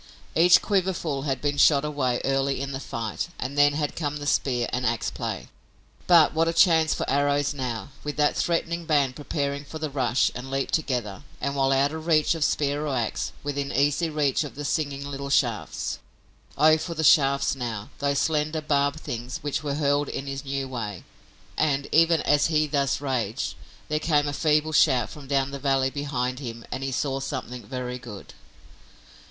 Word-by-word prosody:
Each 170 +2 +7
quiverful 180 -8 -1
had 135 -2 -1
been 145 -1 -1
shot 140 0 +5
away 130 -5 -1
early 135 0 +1
in 140 +1 -4
the 135 - -4
fight 115 0 -4
and 130 +3 -4
then 145 0 +5
had 150 0 -2
come 150 -2 -2
the 145 - -7
spear 125 -4 +1
and 125 - -1
ax 115 -1 0
play. - - -5 0.6
But 170 -3 +6
what 165 +1 +2
a 165 - +1
chance 165 -3 +4
for - - -3
arrows 145 +1 +1
now, 125 -3 -4
with 150 0 -4
that 150 0 +2
threatening 170 0 -1
band 145 -5 +2
preparing 140 -1 -3
for 155 +2 -8
the 155 -2 -4
rush 130 -3 +1
and 125 +2 -7
leap 135 0 -2
together, 125 -10 -1 0.2
and, 140 0 -2
while 135 -1 +2
out 135 +1 +3
of 160 +1 -7
reach 155 -2 +4
of 165 -2 -1
spear 145 0 0
or 140 - -1
ax, 115 -3 -2
within 140 -1 -3
easy 145 +4 +1
reach 150 -2 +1
of 145 - -8
the 145 +1 -5
singing 145 -2 -2
little 140 0 -5
shafts! 120 -5 0 0.6
Oh, 155 +2 +6
for 170 +1 -5
the 160 - -2
shafts 140 -2 +4
now, 115 -5 -5
those 140 0 0
slender 155 +2 0
barbed 145 0 0
things 120 +1 -5
which 145 -2 -2
were 145 -2 -2
hurled 145 -1 +1
in 135 - -4
his 135 0 -5
new 135 -1 -3
way! 110 -8 -5 0.5
And, 140 -2 +1
even 165 0 +4
as 145 0 +3
he 155 -1 +2
thus 140 -2 0
raged, 130 -3 -2 0.3
there 150 0 0
came 150 -2 +2
a 145 - -2
feeble 155 +1 +2
shout 130 -7 +3
from 145 -3 -11
down 135 0 +1
the 140 - -5
valley 135 -1 +1
behind 130 -3 -2
him 115 -4 -7
and 135 - -3
he 135 - -2
saw 135 +1 -1
something 125 -2 -5
very 125 -1 -5
good! 110 -5 -10
140 Hz, 190 wpm, -25 LUFS, 135-150 Hz, 0.6 s, Each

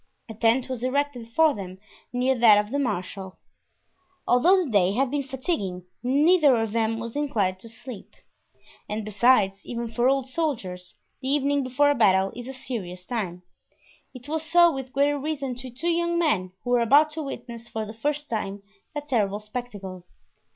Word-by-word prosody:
A 225 - -7
tent 230 +4 +2
was 255 -2 -5
erected 255 -3 -1
for 315 +5 +4
them 185 -2 -7 0.3
near 250 +1 +2
that 220 -3 +7
of 210 +1 0
the 285 - 0
marshal. 190 -5 -3 0.9
Although 355 +10 +4
the 270 - -6
day 195 -2 +3
had 260 +3 +1
been 290 0 0
fatiguing, 255 - -3 0.2
neither 290 +3 +4
of 225 -1 -1
them 225 0 0
was 230 +2 -6
inclined 210 -11 0
to 230 - -10
sleep. 230 -1 -10 0.7
And 210 0 -3
besides, 210 -2 +3
even 235 0 -4
for 240 +3 +1
old 270 -1 +1
soldiers 220 - -3 0.3
the 260 - -2
evening 285 0 +2
before 275 +3 +2
a - - +3
battle 195 -6 +3
is 245 +1 -7
a - - -5
serious 190 -9 -6
time; 185 -7 -4 0.7
it 255 0 -12
was 315 +1 -1
so 345 +1 +5
with 265 -1 -6
greater 285 +2 +2
reason 275 -3 -3
to 255 +1 -8
two 265 +8 -3
young 340 0 0
men 210 - +1
who 245 - -3
were 245 -1 +4
about 290 +7 +5
to 315 +1 -5
witness 235 -4 -7
for 220 -1 -4
the 215 - -8
first 295 +6 -2
time 200 -3 -4 0.3
that 295 0 -5
terrible 210 -6 +1
spectacle. 210 -5 -7
245 Hz, 180 wpm, -25 LUFS, 210-285 Hz, 0.9 s, that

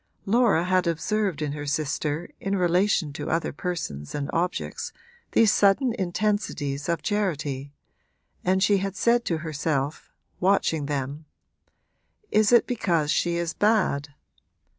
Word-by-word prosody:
Laura 220 -5 +3
had 185 0 +2
observed 180 0 0
in 145 - -2
her 145 0 -5
sister 150 +2 -1
in 195 0 -1
relation 180 -3 +2
to 145 +1 -5
other 165 +1 -1
persons 145 - -4
and 145 -1 -3
objects 175 +2 -2 0.4
these 220 -3 +5
sudden 225 +5 +3
intensities 180 - -1
of 170 - -1
charity, 150 - -2 0.7
and 190 +1 +2
she 200 +1 +4
had 195 0 -3
said 235 +3 +3
to 170 -8 -1
herself, 150 -2 -2 0.3
watching 180 -6 +2
them 145 +1 -3 1.1
'Is 215 0 +4
it 240 - +6
because 170 - 0
she 170 -1 +1
is 170 -1 -1
bad? 190 -9 +1
170 Hz, 130 wpm, -25 LUFS, 150-200 Hz, 1.1 s, it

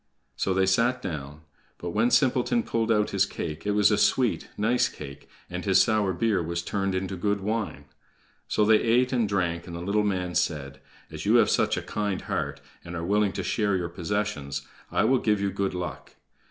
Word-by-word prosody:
So 95 - 0
they 95 0 +3
sat 115 +7 +2
down; 75 - -6 0.4
but 85 - -5
when 110 +6 +2
Simpleton 135 - +2
pulled 115 0 0
out 105 -1 +2
his 100 0 +2
cake, 80 +1 -5
it 105 - +2
was 105 0 +4
a 105 - +2
sweet, 125 -3 +2
nice 115 +4 +2
cake, 70 -2 -10 0.2
and - - -5
his - - +4
sour 105 -3 +3
beer 95 +1 +1
was 85 +1 -3
turned 100 -2 -1
into 95 +1 -2
good 100 +3 0
wine. 105 -7 -3 0.6
So 105 - +2
they 110 0 +5
ate 125 +3 +2
and 115 -5 +1
drank, 85 -4 -1
and 85 - -7
the - - -5
little 100 +4 +1
man 90 -3 -1
said: 75 -6 -2 0.3
"As - - -6
you - - +5
have - - +5
such - - +2
a - - -3
kind 105 -3 -2
heart, - - -3 0.2
and 85 0 -7
are 85 0 -3
willing 105 +1 +2
to - - -3
share 105 -3 +1
your 90 -2 -2
possessions, 85 -6 -3 0.3
I - - +2
will 130 +3 +3
give 105 -3 +1
you 100 0 0
good 95 -1 -2
luck. 90 -5 -6
100 Hz, 205 wpm, -26 LUFS, 85-110 Hz, 0.6 s, they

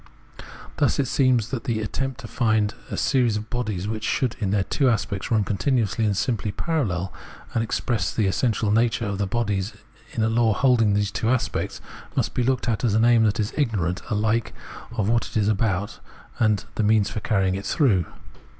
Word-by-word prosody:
Thus - - +2
it 140 - +1
seems 125 -5 +2
that 130 -2 -4
the 115 -5 0
attempt 135 +4 -3
to 115 - -8
find 110 -3 +1 0.2
series 125 -6 +2
of 105 0 -7
bodies 105 -6 -2
which 110 0 -3
should 120 +1 0
in 100 -4 -1
their 100 0 +2
two 135 +6 +1
aspects 100 -3 -1
run 110 -4 +3
continuously 110 +2 0
and 100 -2 +1
simply 110 -3 -1
parallel, 100 - -2 0.4
and 115 - +1
express 115 0 -1
the 110 - 0
essential 105 +1 +1
nature 115 +1 +2
of 100 -1 -3
the 100 - 0
bodies 105 -2 -1 0.4
in 110 - 0
a - - +3
law 115 0 +3
hold 125 +1 +3
ing 110 - +4
of 100 - +2
these 105 -1 0
aspects, 120 +2 -1 0.3
must - - 0
be - - 0
looked 130 +1 0
at 115 0 0
as 110 -4 +2
an 110 +1 +4
aim 120 -2 +5
that 105 0 +1
is 105 -1 -1
ignorant 100 - 0
ahke 110 +1 0 0.4
of 110 -4 -1
what 115 +1 +1
it - - -4
is 105 -2 +2
about 105 -2 0 0.4
and 105 -3 +3
of - - -16
the - - -1
means 105 -1 +3
for - - -3
carrying 95 -3 +1
it 95 +1 -4
through. 105 - +2
110 Hz, 200 wpm, -24 LUFS, 105-120 Hz, 0.4 s, aim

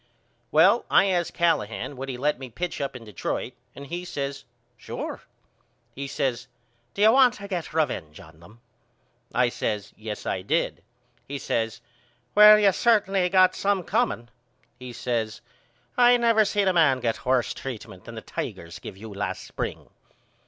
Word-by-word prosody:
Well 185 +10 +5
I - - +5
asked 175 -2 -1
Callahan 115 - 0
would 135 +1 -6
he 125 - -4
let 145 +1 0
me 130 -2 -8
pitch 175 +6 -4
up 140 - -2
to 125 - -8
Detroit 110 +3 -4 0.2
and 140 - -9
he 175 +4 -5
says 140 -5 -5 0.3
Sure. - - -6 0.7
He 140 0 -5
says 125 -3 -2 0.5
Do 200 - +1
you 220 - +8
want 255 -2 +5
to 200 - -9
get 180 -4 -4
revenge 120 - -2
on 80 -4 -15
them? 105 +8 -17 0.7
I 125 0 +2
says, 105 -3 -3
Yes 110 -1 -7
I 95 - -2
did. 155 - -1 0.5
He 140 - -4
says 115 -3 -2 0.5
Well 210 0 +9
you 210 - +2
have 195 - +4
certainly 195 -5 +2
got 185 0 +5
some 200 -2 0
comeing. 195 - -1 0.5
He 125 -1 -8
says 115 -3 -3 0.5
I 245 0 +6
never 230 -2 +4
seen 205 0 +1
no 190 - +3
man 155 -7 +4
get 115 -2 -2
worse 125 -1 +1
treatment 125 -5 -8
than - - -9
them - - -8
Tigers - - -6
give - - -9
you 110 +1 -9
last 100 -2 -4
spring. - - -6
140 Hz, 165 wpm, -25 LUFS, 115-190 Hz, 0.7 s, Well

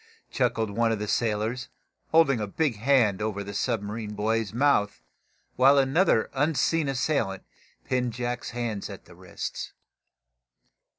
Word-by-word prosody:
chuckled 110 -2 0
one 115 +2 +1
of 110 - 0
the 105 0 -4
sailors, 110 +3 -1 0.4
holding 160 -6 +4
a 105 - -2
big 135 +2 -1
hand 115 -4 +3
over 105 -1 -2
the 100 0 -7
submarine 105 -1 -3
boy's 110 0 0
mouth, 110 - +1 0.5
while 135 +2 +6
another 135 -1 +3
unseen 145 +2 +1
assailant 120 -7 -1 0.4
pinned 125 -2 -1
Jack's 120 +1 -4
hands 115 -4 -4
at 100 - -10
the - - -15
wrists. 90 -1 -6
115 Hz, 130 wpm, -26 LUFS, 105-135 Hz, 0.5 s, while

